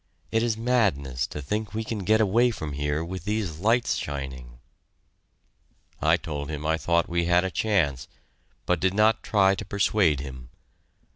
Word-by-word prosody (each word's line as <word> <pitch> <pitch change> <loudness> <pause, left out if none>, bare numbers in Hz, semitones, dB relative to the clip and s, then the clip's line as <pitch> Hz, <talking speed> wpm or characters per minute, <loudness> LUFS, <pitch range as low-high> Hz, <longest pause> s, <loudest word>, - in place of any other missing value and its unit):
It 115 - +2
is 115 -2 0
madness 95 - 0
to 75 - -7
think 105 +8 -3
we 110 - -1
can 110 -1 -4
get 110 +3 +2
away 115 +4 +3
from 80 -10 -5
here 75 +3 -1
with 90 0 -6
these 105 -7 -2
lights 115 +5 +2
shining." 65 -4 -6 1.4
I 80 +2 +4
told 75 -4 -5
him 75 -1 -5
I 80 +1 +2
thought 85 0 +1
we 85 0 0
had 90 +1 +3
a 95 - -2
chance, 85 - 0 0.6
but 90 -2 +1
did 95 +2 +1
not 110 +2 +3
try 95 -2 +3
to - - -4
persuade 100 -7 +2
him. 65 -3 -8
90 Hz, 165 wpm, -26 LUFS, 75-105 Hz, 1.4 s, I